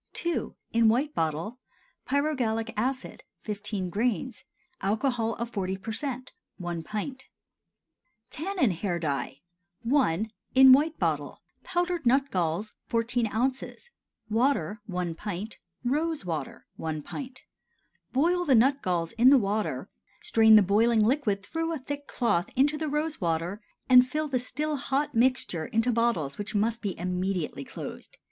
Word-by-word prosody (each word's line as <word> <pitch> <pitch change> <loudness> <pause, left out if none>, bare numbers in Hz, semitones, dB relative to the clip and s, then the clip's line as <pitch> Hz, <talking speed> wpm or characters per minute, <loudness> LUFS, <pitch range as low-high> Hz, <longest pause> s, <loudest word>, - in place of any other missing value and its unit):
II. 345 - -1 0.2
(In 230 -1 +5
White 275 +7 +1
Bottle.) 165 +9 -2 0.5
Pyrogallic 250 -6 0
acid 255 +4 -2 0.2
15 205 -3 -4
grains. 240 +5 -1 0.4
Alcohol 230 +2 0
of 235 +1 -4
40% 225 +7 -3 0.3
1 175 -2 -4
pint. 215 - -5 1.1
TANNIN 340 - 0
HAIR 175 0 -2
DYE. 140 -3 -3 0.5
I. 220 - +2 0.3
(In 265 0 +9
White 305 +4 +3
Bottle.) - - -1 0.2
Powdered 350 -5 -1
nut 270 +3 +3
galls 180 +4 -1
14 230 0 0
oz. 255 - -2 0.4
Water 220 - +1
1 180 -3 -2
pint. 205 +4 -6 0.3
Rose 305 - 0
water 155 -6 -4
1 155 -2 -4
pint. 260 - -7 0.7
Boil 345 +7 +2
the 280 -7 +4
nut 270 +5 +4
galls 170 -2 -1
in 240 +3 +5
the 280 - +8
water, 210 -1 -1 0.4
strain 220 -1 +6
the 210 - +8
boiling 215 +3 +3
liquid 215 -6 +1
through 325 +4 -2
a - - -2
thick 285 +1 -6
cloth 195 -7 0
into 285 +4 +3
the 310 0 -2
rose 300 0 -2
water, 170 +4 -1 0.3
and 250 -1 +7
fill 305 +3 -1
the 260 -3 0
still 295 +5 -2
hot 275 +2 -1
mixture 235 -9 +1
into 225 +2 +1
bottles 225 - 0
which 205 +1 -4
must 225 +3 +1
be 200 -3 -3
immediately 180 -4 -2
closed. - - -9
230 Hz, 135 wpm, -28 LUFS, 195-270 Hz, 1.1 s, In